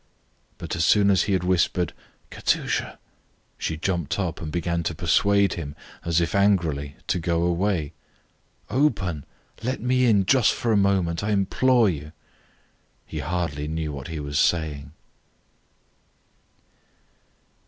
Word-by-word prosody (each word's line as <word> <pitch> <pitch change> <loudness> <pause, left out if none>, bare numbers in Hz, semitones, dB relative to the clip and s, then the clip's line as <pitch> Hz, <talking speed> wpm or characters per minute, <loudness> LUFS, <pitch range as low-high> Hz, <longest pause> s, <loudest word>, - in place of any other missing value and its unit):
But - - -5
as 80 - 0
soon 100 +3 +4
as 95 - +3
he - - +2
had 95 -2 +1
whispered 90 -1 +1 0.4
"Katusha" - - -1 0.6
she 80 - -2
jumped 85 -2 -2
up 90 -5 -3
and 80 -2 -5
began 85 0 -1
to 85 0 -3
persuade 100 +4 +3
him, 75 -4 -6 0.3
as 85 0 +1
if 85 - -1
angrily, 85 -8 +1
to - - 0
go 85 0 0
away. 85 -3 0 0.8
"Open! 100 - 0 0.4
Let 125 +3 -2
me 125 +2 +2
in 100 -4 +4
just 125 0 +4
for 115 - -1
a - - +4
moment! 95 -4 +1
I 105 - -1
implore 115 +4 +3
you!" 75 -3 -4 0.9
He - - -6
hardly 80 -4 -2
knew 80 -1 -3
what 70 -1 -7
he 80 -1 -5
was 70 0 -2
saying. 75 -4 0
85 Hz, 135 wpm, -24 LUFS, 80-100 Hz, 0.9 s, soon